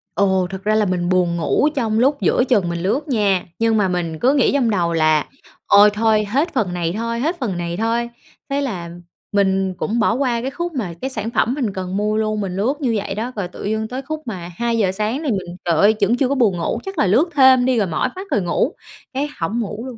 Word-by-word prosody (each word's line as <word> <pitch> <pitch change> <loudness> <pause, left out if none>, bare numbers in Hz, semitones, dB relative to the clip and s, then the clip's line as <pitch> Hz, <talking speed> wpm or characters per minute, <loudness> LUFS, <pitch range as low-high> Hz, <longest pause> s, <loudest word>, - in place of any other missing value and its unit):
Ồ, 190 -2 +2
thật 190 0 -7
ra 215 +1 +2
là 215 -1 +3
mình 180 -2 -1
buồn 180 -2 +2
ngủ 170 - +2
trong 225 -4 0
lúc 275 +3 +2
giữa 245 - +3
chừng 210 -9 +1
mình 170 0 -3
lướt 265 +11 0
nha, 205 -8 +1
nhưng 225 -1 +2
mà 200 -2 +2
mình 170 -3 -2
cứ 260 +3 +3
nghĩ 275 -4 +3
trong 260 -5 +2
đầu 175 -5 0
là 155 -2 +2 0.4
ôi 205 +1 +7
thôi 215 0 +2
hết 280 - 0
phần 180 -5 0
này 170 -1 -2
thôi, 230 +1 -2
hết 320 +7 -1
phần 205 -9 -2
này 170 0 -3
thôi, 230 +2 0 0.4
thế 280 +1 0
là 180 -11 -4 0.4
mình 190 -2 +1
cũng 225 +6 -1
bỏ 220 - +3
qua 245 -2 0
cái 265 +3 -3
khúc 345 +1 -4
mà 205 -10 -3
cái 265 - -2
sản 220 -3 -3
phẩm 235 +1 +1
mình 240 -9 -2
cần 185 0 -4
mua 210 +1 0
luôn. 215 -1 -1
Mình 185 -2 -4
lướt 225 +8 +1
như 240 -4 +1
vậy 200 -1 -4
đó, 235 +4 -3
rồi 200 -4 -3
tự 180 - -10
dưng 220 +1 -1
tới 255 +3 -5
khúc 310 +3 -5
mà 180 -5 -5
2:00 230 -5 +1
sáng 215 +8 -2
thì 275 - 0
mình 180 -3 -4
trời 170 - +2
ơi, 205 +7 +4
vẫn 230 +5 +3
chưa 265 - +2
có 280 - +1
buồn 220 -9 +2
ngủ, 170 +7 -2
chắc 385 -1 -6
là 210 - +3
lướt 260 - +3
thêm 260 -2 +6
đi 255 -2 +2
rồi 200 -4 +1
mỏi 165 +10 -1
mắt 385 +1 -7
rồi 210 - +2
ngủ, 180 - 0 0.4
cái 280 +3 -2
hổng 200 +9 -1
ngủ 215 +2 -4
luôn. 255 -3 -8
215 Hz, 250 wpm, -20 LUFS, 190-250 Hz, 0.4 s, ôi